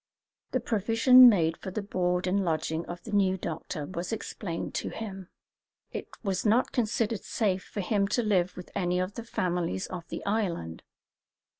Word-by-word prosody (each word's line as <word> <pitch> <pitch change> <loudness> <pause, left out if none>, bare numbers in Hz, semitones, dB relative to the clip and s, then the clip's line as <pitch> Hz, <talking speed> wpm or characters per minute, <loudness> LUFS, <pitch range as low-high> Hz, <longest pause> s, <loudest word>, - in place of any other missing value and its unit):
The - - 0
provision 230 +4 +7
made 165 -6 +2
for 190 - -6
the 200 +2 -4
board 180 -2 0
and 195 +2 +1
lodging 160 -1 -1
of 175 0 -7
the 225 - -8
new 190 -2 +3
doctor 165 -2 -5
was 180 +4 -5
explained 195 -5 -4
to - - -4
him. 195 -4 -7 0.6
It - - -5 0.2
was 195 -3 -1
not 225 +4 +3
considered 225 -2 0
safe 195 -4 0
for 205 - -5
him 200 +1 +1
to 240 +4 +1
live 185 -4 +1
with 180 - -9
any 180 -2 0
of 185 +2 -2
the 235 - -6
families 175 - -1
of 175 -2 -7
the - - -6
island. 185 - -1
190 Hz, 170 wpm, -28 LUFS, 175-215 Hz, 0.6 s, provision